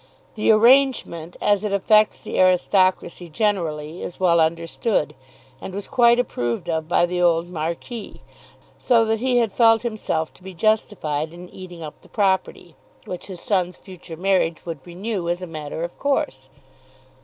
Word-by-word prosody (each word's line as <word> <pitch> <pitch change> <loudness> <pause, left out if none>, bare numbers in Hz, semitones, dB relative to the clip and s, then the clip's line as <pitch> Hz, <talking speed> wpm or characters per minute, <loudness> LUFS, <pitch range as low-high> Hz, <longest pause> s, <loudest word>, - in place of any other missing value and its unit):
The 215 - -1
arrangement, 220 - +3
as 205 0 +2
it 210 - -2
affects 215 +2 +3
the - - -4
aristocracy 185 -1 +2
generally, 165 -4 -2
is 175 - -7
well 170 -2 +3
understood, 165 +4 0 0.5
and 190 - -7
was 200 - -5
quite 235 -1 +4
approved 120 - -2
of 160 -1 -2
by 175 0 +3
the 180 0 -2
old 170 0 +2
marquis 170 +8 -5 0.6
so 230 -3 +3
that 220 0 0
he 250 +1 +1
had 230 -4 +1
felt 225 -1 +4
himself 215 -9 -2
to - - -21
be 190 0 -10
justified 165 -7 0
in 175 +1 -11
eating 180 -3 -10
up 150 - -9
the - - -20
property, 190 -4 -1 0.3
which 180 - -7
his 185 -3 -8
son's 180 -3 -1
future 180 -3 -11
marriage 185 -3 0
would 165 -4 -5
renew 185 0 -4
as 175 +1 -2
a - - -3
matter 155 -1 -6
of 170 - -5
course. 280 - -1
185 Hz, 160 wpm, -22 LUFS, 165-215 Hz, 0.6 s, quite